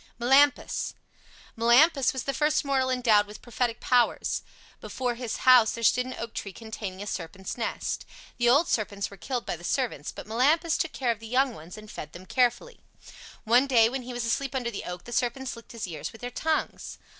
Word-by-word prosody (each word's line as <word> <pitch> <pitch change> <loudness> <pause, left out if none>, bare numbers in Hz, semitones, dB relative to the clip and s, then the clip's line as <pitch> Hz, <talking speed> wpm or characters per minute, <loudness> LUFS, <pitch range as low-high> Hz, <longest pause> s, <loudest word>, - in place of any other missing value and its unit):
MELAMPUS 270 +4 +3 0.6
Melampus 260 +5 +5
was 265 - -4
the 275 - -2
first 300 +1 +1
mortal 265 -2 +1
endowed 230 -5 +3
with 210 +1 -12
prophetic 240 -1 -2
powers. 245 -1 +1 0.4
Before 250 -2 -3
his 235 -1 -5
house 250 -4 +7
there 230 - -6
stood 250 +3 +3
an 255 - -6
oak 230 -1 -6
tree 195 - -5
containing 205 -3 -7
a - - -8
serpent's 190 -1 -5
nest. 235 - -3 0.3
The 240 0 +4
old 285 +7 +5
serpents 200 -3 -1
were - - -10
killed 245 +4 -4
by - - -3
the 175 - -15
servants, 230 - -2
but - - -9
Melampus 295 +10 +2
took 335 - -1
care 250 -3 0
of 225 - -4
the 225 - -9
young 255 +2 +2
ones 170 +1 -11
and 215 0 -11
fed 150 - -8
them 180 +2 -11
carefully. 250 - 0 0.6
One 245 +4 +4
day 230 -4 +5
when 265 +2 -3
he 250 +1 -8
was 240 -1 -3
asleep 270 +4 -1
under 245 -2 -1
the 205 - -6
oak 180 0 -6
the 240 - -11
serpents 255 +2 -1
licked 230 - -13
his 230 - -4
ears 165 -3 -6
with 225 - -14
their 245 0 -5
tongues. 315 +5 -2
240 Hz, 205 wpm, -27 LUFS, 220-260 Hz, 0.6 s, house